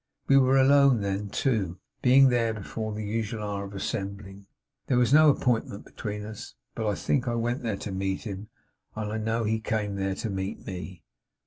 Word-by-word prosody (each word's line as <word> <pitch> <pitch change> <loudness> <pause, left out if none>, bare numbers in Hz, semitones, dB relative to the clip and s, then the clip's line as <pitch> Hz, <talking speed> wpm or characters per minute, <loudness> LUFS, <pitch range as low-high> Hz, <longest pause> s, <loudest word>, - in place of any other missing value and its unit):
We 135 - +5
were 135 0 +5
alone 135 -3 +5
then, 100 +1 -2
too; 100 -8 0 0.2
being 135 +1 +6
there 115 -2 +1
before 110 +1 -5
the 105 0 -4
usual 110 +1 -3
hour 100 -1 -3
of 100 0 -9
assembling. 100 0 -5 0.4
There 130 - +2
was 125 +1 +3
no 155 0 +8
appointment 120 -7 0
between 105 -1 -6
us; 105 - -9 0.2
but 110 - -3
I 105 - +1
think 135 -2 0
I 120 - 0
went 120 +2 -1
there 110 -4 -2
to 100 - -6
meet 95 0 -2
him, 105 -1 -6 0.5
and 105 -1 -3
I 110 - -2
know 110 +1 -1
he 110 +1 0
came 105 -2 -2
there 95 0 -1
to 115 - -4
meet 95 0 -4
me. 90 -1 -7
110 Hz, 195 wpm, -27 LUFS, 100-120 Hz, 0.5 s, no